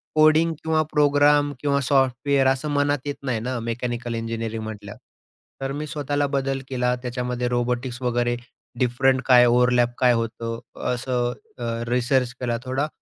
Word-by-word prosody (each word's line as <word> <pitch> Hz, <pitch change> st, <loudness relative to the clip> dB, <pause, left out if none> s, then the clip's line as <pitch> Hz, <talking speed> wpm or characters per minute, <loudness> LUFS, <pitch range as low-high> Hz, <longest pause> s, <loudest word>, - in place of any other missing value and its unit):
Coding 155 Hz, +2 st, +5 dB
किंवा 160 Hz, -1 st, +2 dB
programme 145 Hz, 0 st, +4 dB
किंवा 140 Hz, +1 st, +1 dB
software 135 Hz, +1 st, +2 dB
असं 135 Hz, +3 st, 0 dB
मनात 145 Hz, 0 st, +2 dB
येत 145 Hz, -, -3 dB
नाही 125 Hz, -4 st, -1 dB
ना, 125 Hz, +2 st, -3 dB
मेकॅनिकल 120 Hz, +1 st, -3 dB
इंजिनिअरिंग 115 Hz, -1 st, -4 dB
म्हटल्यावर. 105 Hz, -2 st, -8 dB, 0.6 s
तर 135 Hz, -, -2 dB
मी 150 Hz, +1 st, -4 dB
स्वतःला 145 Hz, -1 st, -1 dB
बदल 135 Hz, -1 st, -1 dB
केला, 125 Hz, -1 st, 0 dB
त्याच्यामध्ये 125 Hz, 0 st, -2 dB
रोबोटिक्स 120 Hz, +1 st, -2 dB
वगैरे, 120 Hz, -1 st, 0 dB, 0.4 s
डिफरंट 130 Hz, +1 st, +2 dB
काय 125 Hz, -2 st, +7 dB
ओव्हरलॅप 120 Hz, 0 st, +3 dB
काय 125 Hz, -1 st, +4 dB
होतो 115 Hz, 0 st, -3 dB, 0.3 s
असं 125 Hz, 0 st, -1 dB, 0.2 s
अ, 120 Hz, -, -6 dB, 0.2 s
रिसर्च 125 Hz, 0 st, +1 dB
केला 120 Hz, -2 st, -1 dB
थोडा 130 Hz, +3 st, -1 dB
125 Hz, 145 wpm, -23 LUFS, 120-140 Hz, 0.6 s, काय